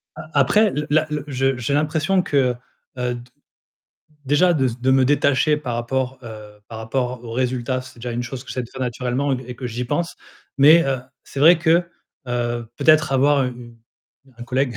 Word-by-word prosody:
A 155 Hz, 0 st, -10 dB
après, 210 Hz, +10 st, +4 dB
l 150 Hz, -3 st, -3 dB
la 155 Hz, +1 st, +2 dB
le 150 Hz, -2 st, -3 dB
je 135 Hz, -1 st, 0 dB
j'ai 125 Hz, +3 st, -2 dB
l'impression 155 Hz, +5 st, +1 dB
que, 130 Hz, -6 st, +1 dB, 0.4 s
heu, 125 Hz, -1 st, -1 dB
d 120 Hz, -, -8 dB, 1.0 s
déjà, 170 Hz, +6 st, +3 dB
de 135 Hz, -4 st, +1 dB
s 120 Hz, 0 st, -2 dB
de 130 Hz, +1 st, +1 dB
me 130 Hz, -1 st, +4 dB
détacher 145 Hz, +1 st, +2 dB
par 125 Hz, -5 st, -4 dB
rapport, 130 Hz, +2 st, -2 dB
heu, 105 Hz, -2 st, -11 dB
par 110 Hz, -1 st, -8 dB
rapport 125 Hz, +1 st, -3 dB
aux 115 Hz, -, -8 dB
résultats, 130 Hz, +1 st, -1 dB
c'est 130 Hz, -2 st, -14 dB
déjà 120 Hz, 0 st, -5 dB
une 120 Hz, +1 st, -3 dB
chose 125 Hz, +1 st, -7 dB
que -, -, -14 dB
j'essaie 125 Hz, -, -3 dB
de 115 Hz, -, -12 dB
faire 130 Hz, -, -8 dB
naturellement 125 Hz, +3 st, -1 dB
et -, -, -1 dB
q 130 Hz, -, -9 dB
et 125 Hz, -, -6 dB
que 125 Hz, 0 st, -5 dB
j'y 120 Hz, +1 st, -4 dB
pense 165 Hz, +6 st, -2 dB, 0.4 s
mais 160 Hz, +4 st, +7 dB
heu, 135 Hz, -2 st, 0 dB, 0.2 s
c'est 135 Hz, -, -8 dB
vrai 165 Hz, +3 st, +7 dB
que, 170 Hz, +1 st, +3 dB, 0.4 s
heu, 120 Hz, -1 st, -2 dB
peut-être 155 Hz, -2 st, +4 dB
avoir 140 Hz, +1 st, +3 dB
u -, -, -1 dB
u 120 Hz, -1 st, -12 dB, 0.6 s
un 120 Hz, -, -8 dB
collègue, 130 Hz, -2 st, -1 dB
130 Hz, 205 wpm, -21 LUFS, 120-145 Hz, 1.0 s, mais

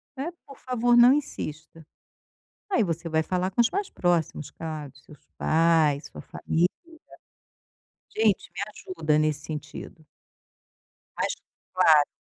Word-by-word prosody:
né, 280 Hz, +6 st, -4 dB
por 275 Hz, -, -13 dB
favor 245 Hz, -1 st, +1 dB
não 240 Hz, +1 st, +8 dB
insista. 165 Hz, -, -5 dB, 0.9 s
Aí 370 Hz, -, +3 dB
você 165 Hz, -1 st, -3 dB
vai 160 Hz, 0 st, +1 dB
falar 180 Hz, +3 st, -1 dB
com 195 Hz, -, 0 dB
os 235 Hz, -, +4 dB
mais 400 Hz, 0 st, -2 dB
próximos 170 Hz, -4 st, 0 dB
claro, 155 Hz, -4 st, -7 dB
seus 150 Hz, -, -17 dB
pais, 160 Hz, -3 st, +3 dB
sua -, -, -10 dB
família, 170 Hz, +2 st, 0 dB, 1.5 s
gente 215 Hz, -3 st, +1 dB
me -, -, -8 dB, 0.4 s
ajuda 155 Hz, -2 st, +2 dB
nesse 155 Hz, -1 st, +1 dB
sentido. 155 Hz, +1 st, -8 dB, 1.1 s
Mais -, -, 0 dB, 0.4 s
claro. 150 Hz, -2 st, +6 dB
165 Hz, 125 wpm, -26 LUFS, 155-225 Hz, 1.5 s, não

